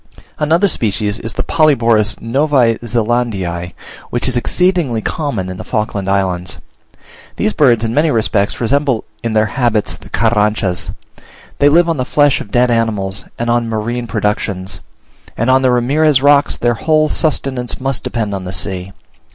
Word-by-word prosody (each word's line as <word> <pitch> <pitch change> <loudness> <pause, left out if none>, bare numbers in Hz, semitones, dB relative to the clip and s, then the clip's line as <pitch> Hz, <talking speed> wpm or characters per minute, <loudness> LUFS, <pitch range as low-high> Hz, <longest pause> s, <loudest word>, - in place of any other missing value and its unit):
Another 165 +6 +3
species 105 - -1
is 115 -1 -5
the - - -2
Polyborus 115 -9 +2
Novae 125 -2 +1
Zelandiae, 110 -7 -2 0.4
which 120 - -2
is 130 - -1
exceedingly 170 -2 +1
common 115 - -3
in 95 0 -6
the - - -7
Falkland 105 -2 -2
Islands. 95 -2 -1 0.8
These 215 0 0
birds 120 -7 +3
in 115 - -2
many 155 +4 +2
respects 110 -5 0
resemble 135 0 +1 0.2
in 115 -1 -2
their 110 0 +3
habits 115 -2 0
the - - -15
Carranchas. 105 -5 0 0.7
They 145 - +5
live 170 +3 +4
on 165 -2 0
the 130 - 0
flesh 145 +1 +2
of - - -9
dead 120 +3 +2
animals 105 -4 -1
and 120 - -3
on 120 -1 0
marine 115 +2 -3
productions; 100 -3 -2 0.6
and 115 +3 +2
on 130 +1 +4
the 130 - +3
Ramirez 135 +4 +3
rocks 145 +1 +3
their 120 0 +1
whole 155 +5 +2
sustenance 135 -6 -1
must 135 -1 -2
depend 110 -4 -2
on 95 -1 -4
the 90 - -5
sea. 95 +1 -3
115 Hz, 160 wpm, -15 LUFS, 105-135 Hz, 0.8 s, They